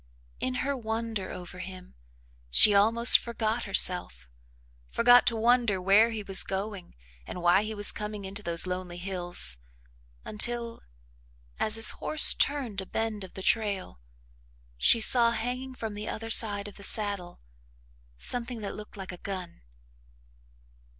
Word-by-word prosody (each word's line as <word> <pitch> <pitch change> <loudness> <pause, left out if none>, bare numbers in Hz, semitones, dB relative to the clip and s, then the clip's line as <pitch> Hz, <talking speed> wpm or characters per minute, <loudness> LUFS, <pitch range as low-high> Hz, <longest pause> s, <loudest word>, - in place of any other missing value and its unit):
In 255 - -3
her 280 0 -2
wonder 225 -4 -5
over 180 0 -10
him, 185 -1 -11 0.6
she 205 - +7
almost 225 +4 +5
forgot 230 0 -4
herself, 180 - +1 0.6
forgot 245 +1 +4
to 235 - +1
wonder 235 -3 +1
where 200 +5 +3
he 220 -2 -6
was 195 -1 +2
going 195 -2 -7 0.3
and - - -8
why 175 +2 +2
he 215 +1 -6
was 205 0 +5
coming 210 -1 -7
into 195 +2 -8
those 170 -3 0
lonely 180 -1 -6
hills 175 - -2 0.7
until, 235 +2 -1 0.8
as 215 - +1
his 225 -1 +3
horse 310 - +6
turned 255 -9 -1
a 190 - -11
bend 225 -2 -4
of 185 - -13
the 190 - -7
trail, 200 - -1 0.8
she 145 - +2
saw 235 +1 +3
hanging 250 +3 -5
from 225 -3 -7
the 210 +1 -7
other 225 +1 -7
side 205 -2 +2
of 205 - -13
the 200 - -13
saddle 200 -5 +2 0.8
something 240 - -5
that 200 - -6
looked 210 0 -12
like 190 -1 -8
a 180 - -10
gun. 185 -2 -8
210 Hz, 145 wpm, -27 LUFS, 190-230 Hz, 0.8 s, she